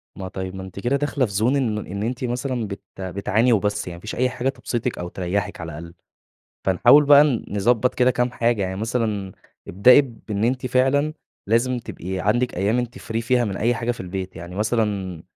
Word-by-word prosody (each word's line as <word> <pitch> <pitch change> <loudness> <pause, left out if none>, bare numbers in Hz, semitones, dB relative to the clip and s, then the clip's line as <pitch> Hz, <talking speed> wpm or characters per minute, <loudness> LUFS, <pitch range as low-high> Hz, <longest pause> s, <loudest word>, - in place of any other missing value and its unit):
ما 95 - -6
طيب، 95 0 -6
ما 95 - -6
أنتِ 95 0 -9
كده 120 +6 0
داخلة 140 -1 0
في 105 - -6
زون 110 +7 +2
إن 125 -6 0
ما 105 - -3
إن 100 +2 -5
أنتِ 125 +3 -3
مثلًا 125 -1 -2
بت 100 -1 -7 0.2
بتعاني 100 +5 +1
وبس. 105 -2 0
يعني 85 - -6
ما - - -14
فيش 110 - -6
أي 125 +1 +1
حاجة 125 +1 -1
تبسِطِك، 120 -3 -3
أو 90 - -4
تريّحِك 90 0 -3
على 85 0 -6
الأقل. 85 +1 -9 0.7
فنحاول 100 +10 +6
بقى 145 0 +8 0.2
نضبّط 115 +5 +1
كده 125 0 +3
كام 125 0 0
حاجة. 120 -3 0
يعني 95 0 -3
مثلًا 110 -3 -2 0.4
ابدئي 125 +9 +7
بإن 110 -5 -4
أنتِ 125 +2 0
فعلًا 135 +4 +2 0.3
لازم 120 +4 +2
تبقي 95 -5 -6
عندِك 120 +6 +1
أيام 105 +6 +1
أنتِ 120 0 -3
free 115 -2 -4
فيها 120 +1 +2
من 100 -3 -3
أي 120 +3 +1
حاجة 115 +1 -2
في 120 - -10
البيت. 95 0 -5
يعني 85 +2 -8
مثلًا 105 -5 -1
110 Hz, 205 wpm, -22 LUFS, 95-125 Hz, 0.7 s, بقى